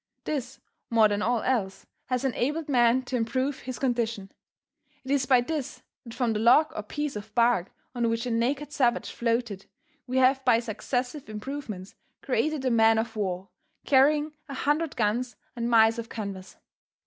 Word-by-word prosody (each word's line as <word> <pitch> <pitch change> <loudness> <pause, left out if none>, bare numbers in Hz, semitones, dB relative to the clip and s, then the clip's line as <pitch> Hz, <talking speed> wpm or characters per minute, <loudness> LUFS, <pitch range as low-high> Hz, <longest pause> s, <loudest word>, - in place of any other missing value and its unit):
This, 270 -3 -4 0.3
more 225 -2 +5
than 205 0 -1
all 235 +1 +1
else, 195 -7 -1 0.2
has 255 +1 -1
enabled 285 +5 -1
man 250 -2 +3
to 255 - -4
improve 255 +4 -1
his 255 -1 -6
condition. 235 -6 -1 0.7
It 265 - -5
is 275 -2 +1
by 255 -2 +5
this 290 +1 -4 0.2
that 230 - -9
from 240 -3 0
the 210 - -1
log 300 +8 +5
or - - -2
piece 295 +6 -4
of 210 0 -8
bark 235 -6 +2 0.2
on 240 -2 0
which 230 +1 -1
a 245 - -2
naked 270 +6 -1
savage 255 -4 +1
floated, 230 -4 -2 0.4
we 255 +1 -1
have 260 +1 +4
by 245 -3 +4
successive 245 +4 -3
improvements 215 -4 -6 0.3
created 275 +2 0
a 255 - +2
man 225 -1 +5
of 225 0 -2
war 190 -2 -3 0.4
carrying 295 +3 +4 0.2
a 275 - -5
hundred 295 +3 0
guns 235 +3 0 0.2
and 235 0 -2
miles 225 0 +5
of 230 - -6
canvas. 200 -4 -7
240 Hz, 170 wpm, -27 LUFS, 225-265 Hz, 0.7 s, more